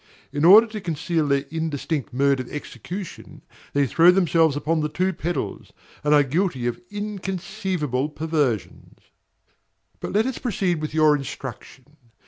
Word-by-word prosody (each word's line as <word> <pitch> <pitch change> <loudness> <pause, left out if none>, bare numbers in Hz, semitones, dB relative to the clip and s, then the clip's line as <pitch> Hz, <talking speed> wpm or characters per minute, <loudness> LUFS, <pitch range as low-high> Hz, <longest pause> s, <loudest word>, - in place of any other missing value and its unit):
In 145 +2 +1
order 210 +6 +9
to 215 -2 -7
conceal 165 -2 -1
their 140 0 +1
indistinct 160 -2 -3
mode 140 +1 +2
of 130 - -5
execution, 175 +5 -8 0.3
they 140 0 +3
throw 165 +7 +5
themselves 165 -5 +3
upon 160 +2 0
the 150 0 -1
two 185 +4 0
pedals, 175 0 -4 0.3
and 150 - +1
are 145 -1 +6
guilty 140 -3 -1
of 120 -1 -2
inconceivable 190 - -3
perversions. 150 - -2 1.0
But - - -5
let 215 +2 +3
us 260 -1 -3
proceed 185 - -1
with 155 0 -4
your 155 -1 +5
instruction. 135 -2 -7
160 Hz, 140 wpm, -23 LUFS, 145-185 Hz, 1.0 s, order